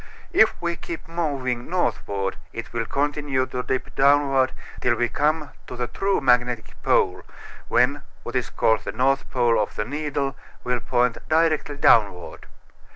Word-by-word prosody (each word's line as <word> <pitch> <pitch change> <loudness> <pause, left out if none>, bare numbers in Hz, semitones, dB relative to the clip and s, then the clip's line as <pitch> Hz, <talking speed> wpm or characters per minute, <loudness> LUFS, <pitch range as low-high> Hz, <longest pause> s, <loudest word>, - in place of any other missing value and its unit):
If 220 - +4
we 170 -1 -2
keep 170 - -7
moving 140 -7 -2
northward 100 - -1 0.2
it 115 - -7
will 115 -1 -2
continue 145 -2 0
to 125 0 -4
dip 130 +1 -3
downward 135 -1 +4 0.3
till 120 -1 +2
we 120 0 +1
come 150 0 0 0.2
to - - -7
the 120 0 -2
true 195 +9 0
magnetic 125 -3 +1
pole, - - +2 0.5
when 130 +4 +2 0.2
what 120 - -7
is 125 -2 0
called 110 -1 +1
the - - -5
north 135 +3 +1
pole 120 -2 +2
of 105 - -3
the 105 - -2
needle 145 +1 -2 0.3
will 125 0 0
point 125 0 +1
directly 155 -2 +2
downward. 100 -10 +2
130 Hz, 155 wpm, -23 LUFS, 120-145 Hz, 0.5 s, If